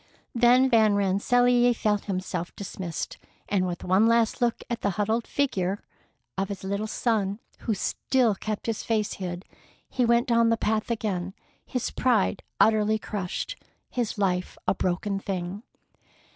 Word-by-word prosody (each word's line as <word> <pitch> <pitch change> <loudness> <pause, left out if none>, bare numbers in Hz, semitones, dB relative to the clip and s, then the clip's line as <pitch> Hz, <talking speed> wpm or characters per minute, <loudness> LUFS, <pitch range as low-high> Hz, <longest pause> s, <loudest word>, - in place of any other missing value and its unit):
Then 245 +2 +5
Van 220 -4 +4
Rensselaer 245 +5 +3
felt 210 -2 0
himself 185 -3 -3
dismissed, 185 -4 -5 0.3
and 190 -2 +1
with 175 -1 -5
one 190 +5 +4
last 230 0 +2
look 240 -1 +1
at 235 - -3
the - - +1
huddled 220 +3 0
figure 200 -9 0 0.6
of 195 - -1
his 200 -2 -6
little 200 +3 -2
son, 210 -4 0 0.2
who 220 - -1
still 240 +3 +1
kept 215 +1 -4
his 225 -2 -2
face 220 -2 0
hid, 180 0 -4 0.4
he 255 - 0
went 235 +1 +4
down 230 -1 +4
the 230 - +2
path 215 +1 0
again, 195 -5 -2 0.3
his 250 - -2
pride 225 -6 +1 0.2
utterly 215 0 +4
crushed, 200 -4 -4 0.4
his 240 -4 -2
life 185 -2 0
a - - +4
broken 195 +2 -1
thing. 190 0 -4
210 Hz, 145 wpm, -26 LUFS, 195-235 Hz, 0.6 s, Then